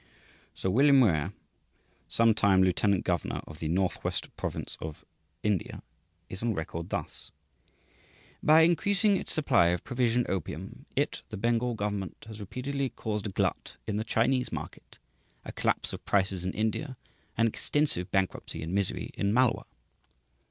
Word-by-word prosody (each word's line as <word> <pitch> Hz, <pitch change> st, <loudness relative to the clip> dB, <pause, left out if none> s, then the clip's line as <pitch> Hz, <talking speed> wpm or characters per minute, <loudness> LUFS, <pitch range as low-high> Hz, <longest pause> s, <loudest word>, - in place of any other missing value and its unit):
Sir 95 Hz, -, -1 dB
William 140 Hz, +6 st, +6 dB
Muir, 80 Hz, -, +3 dB, 0.8 s
some 115 Hz, -1 st, +4 dB
time 95 Hz, -3 st, +4 dB
lieutenant 95 Hz, +1 st, +2 dB
governor 90 Hz, -2 st, -1 dB
of 80 Hz, -, -11 dB
the 80 Hz, -, -3 dB
Northwest 90 Hz, +3 st, -1 dB
Provinces -, -, -4 dB
of 80 Hz, -1 st, -7 dB, 0.4 s
India, 105 Hz, -4 st, -1 dB, 0.4 s
is 95 Hz, -, -7 dB
on 115 Hz, -2 st, 0 dB
record 80 Hz, 0 st, -5 dB
thus: -, -, -4 dB, 1.1 s
"By 155 Hz, +1 st, +6 dB
increasing 200 Hz, +5 st, +4 dB
its -, -, -1 dB
supply 140 Hz, -, +4 dB
of 85 Hz, 0 st, 0 dB
'provision' 125 Hz, -1 st, +1 dB
opium, 95 Hz, -5 st, -5 dB
it -, -, 0 dB
(the -, -, -6 dB
Bengal 120 Hz, +3 st, +1 dB
government) 100 Hz, -3 st, -4 dB
has 110 Hz, -1 st, -9 dB
repeatedly 135 Hz, +6 st, -3 dB
caused 105 Hz, -3 st, -3 dB
a -, -, -5 dB
glut -, -, -2 dB
in 105 Hz, -, -2 dB
the 110 Hz, -, -1 dB
Chinese 125 Hz, +3 st, +1 dB
market, -, -, -8 dB, 0.5 s
a -, -, -6 dB
collapse -, -, 0 dB
of -, -, -7 dB
prices 95 Hz, -2 st, +1 dB
in 95 Hz, -, -2 dB
India, 120 Hz, +5 st, -2 dB, 0.4 s
an 115 Hz, -, +4 dB
extensive 115 Hz, -, +2 dB
bankruptcy 95 Hz, -4 st, -1 dB
and 80 Hz, +3 st, -4 dB
misery 100 Hz, -1 st, 0 dB
in 100 Hz, -, 0 dB
Malwa." 125 Hz, +2 st, +2 dB
105 Hz, 145 wpm, -29 LUFS, 95-125 Hz, 1.1 s, William